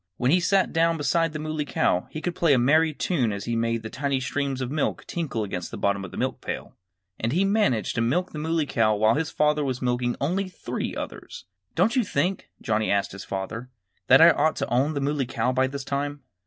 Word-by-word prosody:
When 125 +2 +2
he 180 - +5
sat 190 +2 +2
down 165 0 +2
beside 165 +2 +1
the 155 - -5
Muley 155 0 -3
Cow 90 -9 0
he 155 - -6
could 175 +2 -2
play 165 -3 +3
a - - +5
merry 155 +6 +4
tune 140 - 0
as 100 -1 -5
he 120 - -1
made 115 0 0
the 110 - -5
tiny 140 -1 -1
streams 135 +1 -2
of 130 -1 -3
milk 150 -1 -1
tinkle 150 -10 -3
against 90 -3 -4
the 115 - -7
bottom 100 -1 0
of 95 - -6
the - - -10
milk - - -2
pail. - - -5 0.5
And 115 - -1
he 180 +7 +2
managed 195 - +1
to - - -1
milk 160 +11 0
the 150 - -6
Muley 160 0 0
Cow 110 -5 +2
while 110 +2 +3
his 155 +4 -1
father 150 0 +1
was 130 -2 -2
milking 125 -1 0
only 185 +7 -1
three 180 - -5
others. - - -7 0.3
"Don't 195 +9 +2
you 255 - +3
think," 180 +1 -1
Johnnie 110 -1 0
asked 100 -1 +1
his 100 - -8
father, 105 +6 -5 0.4
"that 135 +3 +7
I 170 +1 +9
ought 155 +1 +1
to - - -3
own 140 +5 +2
the 140 - -1
Muley 140 -2 0
Cow 120 0 0
by 130 +1 +2
this 140 +1 -5
time?" 140 +1 -3
140 Hz, 235 wpm, -25 LUFS, 115-160 Hz, 0.5 s, I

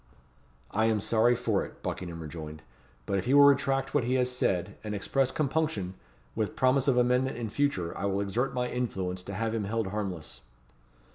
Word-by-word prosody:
"I 110 +1 +2
am 110 -1 +2
sorry 115 +3 +3
for - - 0
it," - - -12
Buckingham 85 -2 -4
rejoined; 75 0 -8 0.4
"but 100 -1 0
if 95 - -4
he 130 - +3
will 145 - +9
retract 135 -1 +3
what 145 - +3
he 125 +2 +1
has 125 -1 +1
said, 100 -5 0
and 105 -1 -3
express 130 +6 +1
compunction, 145 - -1 0.4
with 110 -2 -2
promise 130 +1 +3
of 130 -3 +3
amendment 125 +1 +2
in 115 -3 -4
future, 110 -12 0
I - - -3
will 100 0 0
exert 115 +7 -1
my 125 0 -1
influence 95 -8 -3
to 95 +1 -7
have 115 +2 -1
him 110 -3 -1
held 110 -1 -1
harmless." 90 - -4
115 Hz, 190 wpm, -29 LUFS, 95-130 Hz, 0.4 s, will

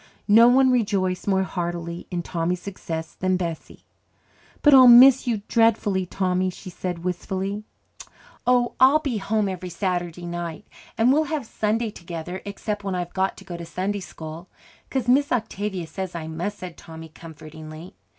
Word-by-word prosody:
No 225 +3 +7
one 260 +1 +5
rejoiced 200 -7 0
more 190 -1 +2
heartily 170 -1 -4
in 175 -2 -3
Tommy's 175 +1 -2
success 165 -4 -6
than 185 0 0
Bessie. 170 -3 -6 0.8
"But 295 - +7
I'll 260 -2 +9
miss 255 +2 +8
you 220 -4 -1
dreadfully, 210 -5 +2
Tommy," 185 0 0
she 185 +1 -10
said 175 -1 -5
wistfully. 190 +3 -3 0.8
"Oh, 245 -1 +3
I'll 265 +4 +7
be 275 -8 -3
home 210 +1 0
every 185 -1 -5
Saturday 175 -1 -3
night, 175 +2 -5 0.3
and 235 +3 +4
we'll 310 +2 +2
have 295 -4 -3
Sunday 220 +1 -1
together, 170 0 -7
except 205 0 -4
when 195 -2 -2
I've 175 -1 -4
got 190 0 -1
to - - -12
go 180 -2 -7
to 170 - -7
Sunday 190 +4 -3
school. 165 -1 -9 0.4
'Cause 260 -3 -2
Miss 280 +3 +3
Octavia 205 -6 -2
says 185 +2 -6
I 165 -2 -4
must," 170 +6 -4
said 180 -2 -9
Tommy 160 -1 -11
comfortingly. 155 +1 -11
190 Hz, 160 wpm, -24 LUFS, 175-220 Hz, 0.8 s, I'll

